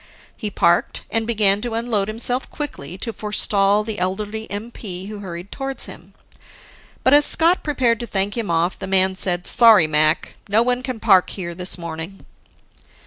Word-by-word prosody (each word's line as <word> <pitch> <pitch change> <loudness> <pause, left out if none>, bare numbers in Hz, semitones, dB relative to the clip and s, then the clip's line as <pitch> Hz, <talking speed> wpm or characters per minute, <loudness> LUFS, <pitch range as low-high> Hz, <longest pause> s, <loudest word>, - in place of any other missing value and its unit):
He 215 - -5
parked 175 -3 +1
and 225 0 0
began 205 -3 +2
to 235 -1 -4
unload 225 -4 0
himself 245 +4 -1
quickly, 185 - -6
to 230 +4 -3
forestall 210 -1 +1
the 215 -2 -5
elderly 210 +4 -3
MP 205 -3 -6
who 210 -1 -8
hurried 180 -1 -8
towards 270 -1 -5
him. - - -13 0.9
But, 260 - +4
as 295 0 +6
Scott 335 +4 +3
prepared 255 -6 0
to 235 - -6
thank 200 0 -2
him 230 -5 -3
off, 170 +2 0
the 190 - -5
man 190 0 +2
said, 180 -1 +3
"Sorry, 225 -8 +6
Mac, 155 +1 +1
no 215 +3 +3
one 250 +1 0
can 255 -3 -5
park 185 -3 +4
there 175 -3 -5
this 180 +2 -1
morning." 170 +2 -8
205 Hz, 170 wpm, -20 LUFS, 185-230 Hz, 0.9 s, as